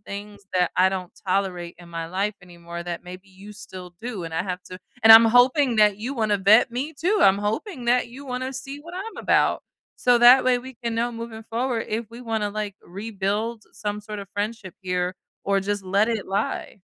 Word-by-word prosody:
things 205 0 -9
that 180 -1 +2
I 185 +1 +5
don't 185 -2 -5
tolerate 185 -2 -1
in 175 -1 -13
my 165 -1 -5
life 195 +4 -1
anymore 170 -1 -9
that 175 -1 -5
maybe 185 +2 -10
you 195 +2 -13
still 185 -4 -11
do, 225 -7 -5
and 165 - -6
I 165 - 0
have 180 -1 -5
to 185 - -10 0.2
and 225 - +7
I'm 225 +1 +11
hoping 245 +2 +4
that 210 -2 +5
you 235 +6 -4
wanna 215 -4 +1
vet 210 +5 +5
me 265 +6 -3
too, 370 +8 +1
I'm 195 +1 +5
hoping 240 - -3
that 245 0 +2
you 270 +4 -11
wanna 255 +1 -3
see 270 +2 -7
what 340 +4 -11
I'm 400 +5 -6
about. - - +2 0.3
So, 245 -1 +4
that 245 +2 +8
way 255 -1 +3
we 260 +1 -10
can 230 -1 -1
know 235 +1 0
moving 230 -1 -7
forward 235 +1 -2
if 220 0 -3
we 235 +1 -10
wanna, 220 -3 -2
like, 210 -1 -4
rebuild 210 +3 -3
some 210 0 -4
sort 210 0 -7
of 200 -1 -8
friendship 205 -2 -4
here 180 0 -1 0.3
or 200 0 +2
just 205 +1 -2
let 200 +4 +2
it 225 -4 -2
lie. 195 0 -3
210 Hz, 210 wpm, -24 LUFS, 190-240 Hz, 0.3 s, I'm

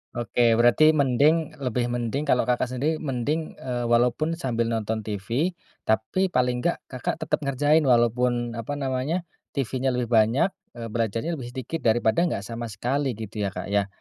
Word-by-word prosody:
Oke, 120 0 -1 0.2
berarti 140 +6 +6
mending 145 +4 +3
lebih 120 0 0
mending 120 +5 -2
kalau 125 - +3
Kakak 125 +1 0
sendiri 145 +6 -1
mending, 145 +3 -2
eee, 120 -2 -3
walaupun 125 +7 +2
sambil 115 -7 -1
nonton 110 -1 -1
TV, 115 - -1 0.3
tapi 110 +13 +1
paling 125 -6 +1
enggak 170 +6 -1
Kakak 125 -2 -2
tetep - - 0
ngerjain 145 +2 +2
walaupun, 120 0 +2
apa 135 +6 -4
namanya, 140 +5 -1 0.3
TV-nya 130 -1 -1
lebih 125 -1 -2
banyak, 115 - +3 0.2
eee, 115 -2 -6
belajarnya 115 +7 -1
lebih 120 - -6
sedikit 130 +6 -4
daripada 115 +8 +3
enggak 105 -10 -3
sama 115 +2 -5
sekali 125 +5 -1
gitu 110 0 -7
ya 100 -2 -2
Kak 90 +2 -5
ya? 100 -1 +2
125 Hz, 165 wpm, -25 LUFS, 115-145 Hz, 0.3 s, berarti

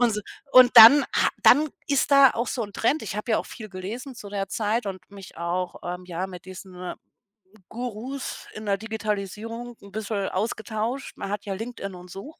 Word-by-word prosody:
Und, 245 -2 +4
s - - -2 0.3
und 255 -2 +8
dann 235 +6 +11
ha - - +4
dann 300 +4 +6 0.2
ist 285 0 +2
da 275 -2 +8
auch 235 +1 -2
so 245 - -2
'n 205 - -11
Trend, 280 +10 0
ich 210 - -5
habe 215 +2 -2
ja - - +3
auch - - -5
viel 215 -2 -9
gelesen 220 +8 -7
zu 210 -4 -9
der 195 -1 -3
Zeit 220 +1 -1
und 185 -1 -7
mich 195 -2 -12
auch, 175 +2 -2
ähm, 180 +1 -5
ja, 180 +1 -3
mit 180 -2 -11
diesen 185 -1 -8 0.8
Gurus 245 +3 -6
in 215 - -8
der 200 -1 +1
Digitalisierung 220 +2 -5
'n 200 - -14
bisschen 205 -1 -3
ausgetauscht. 220 +5 -3
Man - - -5
hat 205 0 -4
ja 200 - -3
LinkedIn 200 -2 -6
und 180 0 -12
so. 270 - -9
215 Hz, 200 wpm, -25 LUFS, 195-240 Hz, 0.8 s, dann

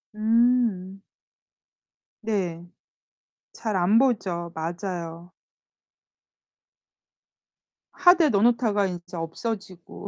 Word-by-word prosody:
음. 220 -4 +1 1.2
네. 185 -6 -3 0.9
잘 215 -3 -4
안 185 +4 +3
보죠. 190 -10 0
맞아요. 170 0 -5 2.6
하드에 355 -3 +5
넣어 200 -5 +2
놓다가 225 -3 +2
이제 175 -1 -8
없어지고. 185 +2 -6
195 Hz, 135 characters per minute, -25 LUFS, 175-225 Hz, 2.6 s, 하드에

